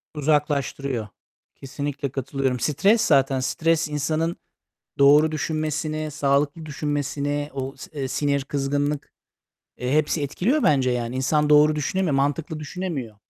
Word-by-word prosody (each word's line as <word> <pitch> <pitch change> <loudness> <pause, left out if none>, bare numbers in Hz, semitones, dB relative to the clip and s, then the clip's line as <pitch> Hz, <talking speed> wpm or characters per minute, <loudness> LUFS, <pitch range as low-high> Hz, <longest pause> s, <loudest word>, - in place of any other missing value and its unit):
Uzaklaştırıyor. 140 -5 0 0.5
Kesinlikle 140 0 -4
katılıyorum. 135 -1 -2
Stres 195 - +3
zaten, 135 -2 +3
stres 160 +5 +1
insanın 155 +3 -1 0.6
doğru 150 +3 +6
düşünmesini, 155 0 -2
sağlıklı 145 +2 0
düşünmesini, 145 0 -2
o, 135 0 -4
s - - -11
eee, 135 - -2
sinir, 140 0 0
kızgınlık, 145 +1 -2 0.7
eee, 125 +2 -2
hepsi 150 0 +1
etkiliyor 210 - 0
bence 135 -4 +3
yani. 120 +1 -2
İnsan 150 +3 +1
doğru 150 +1 +6
düşünemiyor, 160 +1 0
mantıklı 145 +3 -1
düşünemiyor. 150 - -5
145 Hz, 115 wpm, -23 LUFS, 135-155 Hz, 0.7 s, doğru